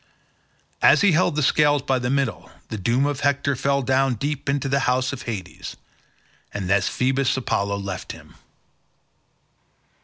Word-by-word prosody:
As - - +6
he 200 -2 +5
held 160 -2 +2
the 150 - +1
scales 145 0 +3
by 135 -2 +1
the 125 0 -2
middle, 135 -4 -1 0.2
the 110 - -4
doom 120 +8 +1
of 145 -1 -2
Hector 140 0 +1
fell 140 +2 0
down 130 0 +2
deep 145 +4 -3
into 140 0 0
the 140 +1 +1
house 130 +2 0
of 130 - -6
Hades—and 100 -2 -9
then 100 +2 +3
Phoebus 130 +6 0
Apollo 100 -5 -1
left 95 -2 -5
him. - - -13
130 Hz, 150 wpm, -23 LUFS, 115-140 Hz, 0.2 s, As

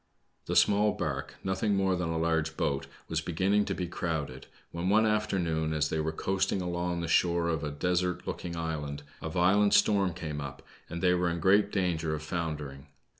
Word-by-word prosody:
The - - -1
small 105 +1 +4
bark, 70 -2 -3
nothing 95 +2 0
more 95 -1 +2
than 90 -2 -2
a 80 - -1
large 80 -1 0
boat, 70 -1 -1 0.2
was 80 0 -1
beginning 95 +5 +1
to 100 - -2
be 90 - -2
crowded, 80 -6 -4 0.2
when 85 +2 -2
one 110 +2 +5
afternoon, 90 -7 0
as 75 -1 +1
they 80 - -1
were 80 +1 0
coasting 95 +4 0
along 90 -1 -2
the 85 - -3
shore 85 0 +2
of 80 -3 -1
a 75 - -1
desert 90 +4 -1
looking 85 -1 -4
island, 75 -3 -4 0.2
a 80 - -4
violent 95 +5 +4
storm 100 -5 +3
came 75 -4 -4
up, 70 0 -7 0.3
and 85 +2 -5
they 90 -1 +5
were 90 0 +1
in 85 0 -2
great 100 +4 +4
danger 85 -5 0
of 75 - -6
foundering. 75 -4 -4
85 Hz, 190 wpm, -29 LUFS, 80-95 Hz, 0.3 s, one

